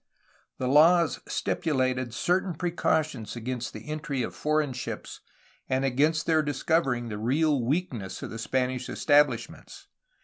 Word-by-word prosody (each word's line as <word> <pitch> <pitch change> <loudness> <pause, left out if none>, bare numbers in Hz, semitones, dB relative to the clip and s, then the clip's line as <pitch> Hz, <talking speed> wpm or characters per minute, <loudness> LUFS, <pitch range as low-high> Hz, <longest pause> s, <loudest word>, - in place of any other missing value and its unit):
The 130 - -2
laws 165 +4 +5
stipulated 130 -6 -1
certain 180 +7 0
precautions 155 - -1
against 120 +1 -4
the - - -10
entry 150 -4 -3
of - - -4
foreign 150 -2 0
ships 125 - -6 0.5
and 130 +1 +1
against 150 +5 +2
their 160 -1 +3
discovering 145 -4 0
the 105 -1 -5
real 140 +3 +1
weakness 125 - -2
of - - -6
the 115 - -6
Spanish 125 +1 -1
estabhshments. 145 0 +1
140 Hz, 130 wpm, -27 LUFS, 125-155 Hz, 0.5 s, laws